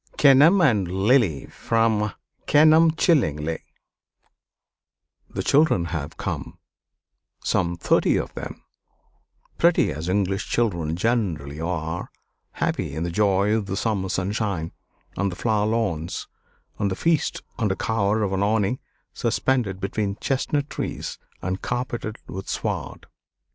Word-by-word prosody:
KENELM 150 +7 +6
AND 110 - +3 0.2
LILY 110 - +3
From 110 -2 0 0.4
'Kenelm 155 +2 +6
Chillingly' 80 - +1 1.7
The - - -4
children 145 - +3
have 75 -3 -4
come, - - -4 0.9
some 85 -1 +1
thirty 85 - +2
of - - -3
them, - - -7 1.0
pretty 170 0 +4
as 80 +4 -4
English 95 0 0
children 85 -9 0
generally 85 - -1
are, 80 0 -3 0.4
happy - - -2
in 80 - -2
the 85 - -2
joy 100 +1 +2
of 110 -3 0
the 95 0 -3
summer 100 -4 -1
sunshine, 95 -3 -2 0.4
and 100 +1 0
the - - -6
flower 105 0 +1
lawns, 100 -8 -2 0.5
and 100 - +1
the 95 - -2
feast 165 - 0 0.2
under 105 -5 +1
cover 110 0 0
of 95 -2 -1
an 95 - 0
awning 105 +3 +1 0.3
suspended 120 -8 0
between 100 +1 -2
chestnut 140 +1 0
trees - - -5 0.2
and 95 +1 -2
carpeted 120 -3 -3
with 95 +1 -7
sward. - - -3
100 Hz, 120 wpm, -24 LUFS, 90-120 Hz, 1.7 s, KENELM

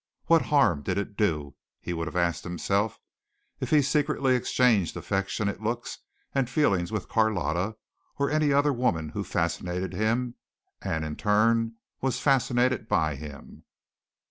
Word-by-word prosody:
What 165 -1 +5
harm 135 - +3
did 90 +5 -2
it 100 +1 -3
do, 75 -9 0 0.3
he 85 - -4
would 80 -1 -3
have - - -7
asked 85 -3 0
himself, 100 +5 -1 0.6
if - - -3
he 150 -2 +5
secretly 145 -2 +2
exchanged 115 -6 +2
affectionate 100 +1 -2
looks 115 +2 -3 0.3
and 135 -3 +1
feelings 100 - +1
with 105 - -3
Carlotta 105 -2 0 0.4
or 140 0 0
any 155 -1 +2
other 140 +1 +3
woman 85 - 0
who - - -4
fascinated 90 +1 -2
him 120 +3 0 0.5
and 80 -1 -2
in 75 -1 -5
turn 115 +2 +2 0.3
was 135 -1 0
fascinated 125 -3 +2
by 80 -1 +2
him? 70 0 -10
110 Hz, 145 wpm, -27 LUFS, 90-130 Hz, 0.6 s, What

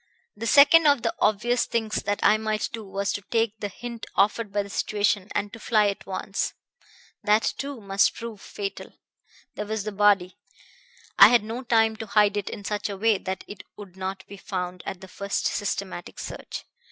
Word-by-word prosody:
"The 225 +2 -4
second 295 +4 +7
of 285 -5 +4
the 230 - 0
obvious 235 +4 +2
things 225 -2 -1
that 205 0 0
I - - +6
might 215 -1 -1
do 225 -1 -5
was 200 0 -2
to 205 - -4
take 225 +1 -1
the 205 - -2
hint 235 +3 -8
offered 210 +1 +2
by 205 0 0
the 200 - -11
situation, 205 -2 0
and 205 0 -1
to 225 - -9
fly 215 -2 +3
at 200 - -6
once. 195 +1 -3 0.7
That 210 +1 +3
too 280 -2 -4
must 195 -1 +2
prove 230 -3 -7
fatal. 200 -1 -6 0.6
There 210 - -5
was 220 -1 -2
the 215 - -4
body. 200 -3 +2 0.8
I - - +12
had 240 -3 +4
no 225 +4 -5
time 225 -3 +2
to 225 - -6
hide 210 -1 +3
it 205 -2 -2
in 205 - -8
such 210 +1 -2
a 200 - -5
way 215 0 +2
that 190 0 -5
it 205 - -9 0.2
would 200 -3 -11
not 190 0 -5
be 200 - -11
found 180 -1 -4
at 190 -2 -5
the 190 - -10
first 200 +2 -3
systematic 195 -3 -3
search. - - -7
205 Hz, 195 wpm, -25 LUFS, 195-225 Hz, 0.8 s, I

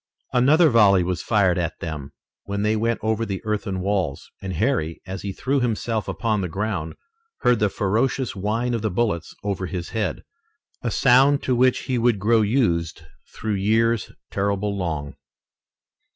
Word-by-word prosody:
Another 150 +6 +5
volley 100 -5 +5
was 90 0 -2
fired 95 -5 +2
at 85 -1 -3
them, 75 -4 -6 0.3
when 100 +1 -2
they 105 +1 +2
went 115 +1 0
over 110 0 0
the 100 -4 -3
earthen 105 -3 -2
walls, 95 -7 -2
and 95 -1 -4
Harry, 85 - 0
as 95 0 -6
he 100 - -4
threw 135 +8 -1
himself 115 -2 -1
upon 110 -4 -1
the 90 - -1
ground, 95 -4 -3 0.5
heard 125 -2 +3
the 105 - +2
ferocious 115 +6 0
whine 110 +5 -1
of 115 - -1
the 110 - 0
bullets 95 -5 -1
over 100 -2 -2
his 90 -2 -5
head, 110 -4 -2 0.6
a 120 - -1
sound 135 +5 +4
to 130 - +1
which 125 +1 +3
he 125 -2 -1
would 115 -2 +3
grow 110 +3 +3
used 85 - 0 0.3
through 110 -1 -3
years 110 +3 +1 0.2
terribly 100 +1 0
long. 80 -7 -3
105 Hz, 165 wpm, -23 LUFS, 95-115 Hz, 0.6 s, Another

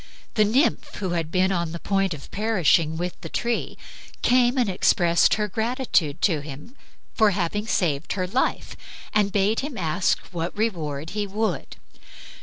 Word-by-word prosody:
The 215 - +4
nymph, 275 +5 +1
who 190 -3 -3
had 165 -2 -1
been 185 +2 +2
on 170 -3 -1
the 170 - -5
point 195 -3 0
of 140 - -13
perishing 180 -7 +2
with 175 +1 -4
the 165 - -7
tree, 235 +6 -2 0.5
came 250 +1 +4
and 245 -3 +2
expressed 175 -2 +3
her 210 -1 -1
gratitude 220 - 0
to 165 -7 +3
him 150 - -10 0.4
for 220 -2 +4
having 205 +2 -2
saved 150 -10 0
her 185 -1 -1
life 245 +9 -1 0.4
and 205 -1 +2
bade 205 +3 +2
him 280 -3 -5
ask 165 +1 +1
what 170 +2 -4
reward 160 -9 -2
he 205 0 -2
would. 205 -4 -2
190 Hz, 160 wpm, -24 LUFS, 165-220 Hz, 0.5 s, The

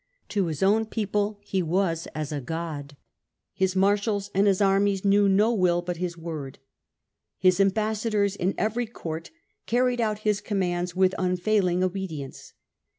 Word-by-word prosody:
To 200 -4 0
his 155 +1 -2
own 215 +3 +3
people 210 -1 -1
he 195 -2 -1
was 170 -1 0
as 155 -1 -3
a 145 -2 -3
god. 145 -1 -5 0.6
His 190 -1 0
marshals 200 +1 +1
and 195 +2 +3
his 195 -2 +3
armies 195 0 +2
knew 200 0 +4
no 210 +4 +3
will 175 -4 +2
but 175 -1 -4
his 175 -1 -3
word; 155 -5 -6 0.8
his 185 0 +3
ambassadors 210 0 +1
in 190 0 -1
every 225 +2 -1
court 165 -7 -6 0.4
carried 245 0 +2
out 215 -2 0
his 210 -1 +2
command^ 180 -4 -1
with 185 0 +3
unfailing 180 0 +1
obe 190 +1 -2
dience. 140 -4 -8
190 Hz, 155 wpm, -26 LUFS, 175-205 Hz, 0.8 s, knew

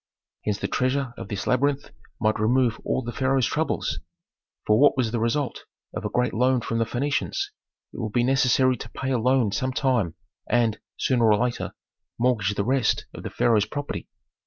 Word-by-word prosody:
Hence 105 -2 0
the - - -2
treasure 130 0 0
of - - -7
this 100 -3 -4
labyrinth 140 +2 +1 0.3
might 110 0 +1
remove 120 +2 +2
all 130 - -1
the 120 - -4
pharaoh's 130 0 +1
troubles. - - -1 0.7
For 105 +1 +4
what 145 -1 +5
was 120 -4 +1
the 120 - -1
result 125 +5 -1 0.3
of - - -4
a - - -1
great 125 0 0
loan 125 +1 +2
from 115 0 -2
the 115 - +2
Phœnicians? 140 - -1 0.6
It - - -8
would 110 -3 -3
be 120 +2 +2
necessary 130 0 +3
to - - -8
pay 130 0 -4
a 125 - +2
loan 125 -2 +2
some 130 +5 -1
time, 125 - +1 0.3
and, 115 -3 +2 0.2
sooner 120 -4 +3
or 105 - +5
later, 120 +2 -2 0.4
mortgage 115 -5 +1
the 100 - -1
rest 130 -1 +1
of - - -8
the - - -5
pharaoh's 110 -3 +2
property. 145 +4 -5
125 Hz, 185 wpm, -25 LUFS, 110-130 Hz, 0.7 s, what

